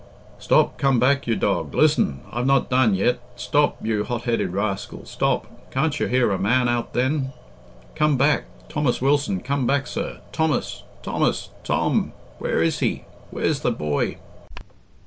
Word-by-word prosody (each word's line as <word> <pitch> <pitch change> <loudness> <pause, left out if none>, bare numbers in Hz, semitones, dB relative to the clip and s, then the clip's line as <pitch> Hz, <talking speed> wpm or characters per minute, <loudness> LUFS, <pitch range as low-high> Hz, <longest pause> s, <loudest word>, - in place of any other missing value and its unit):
"Stop! - - +2
come 135 -3 +3
back, 135 +2 +2
you 115 - +2
dog! 100 -4 -1
Listen! 145 - +3
I've 120 +2 -1
not 135 -1 +2
done 125 -5 +4
yet. 120 +7 +1 0.2
Stop! 125 +5 +1
you 110 -2 0
hotheaded 120 -4 -1
rascal, 100 +1 -3
stop! - - 0 0.2
Can't 145 +2 0
you - - 0
hear 125 -3 +2
a 95 - -1
man 125 +5 +2
out 120 -1 -1
then? 130 +2 0 0.6
Come 150 -2 +2
back! 140 +3 +2 0.2
Thomas 145 -5 0
Wilson, 140 -7 +1
come 135 0 -1
back, 140 +1 +1
sir! - - -4
Thomas! 160 -5 -1 0.2
Thomas! - - 0
Tom! - - 0 0.3
Where 80 - 0
is 80 - 0
he? - - -1 0.3
Where's - - -1
the - - 0
boy?" 75 -1 -1
125 Hz, 150 wpm, -23 LUFS, 110-140 Hz, 0.6 s, done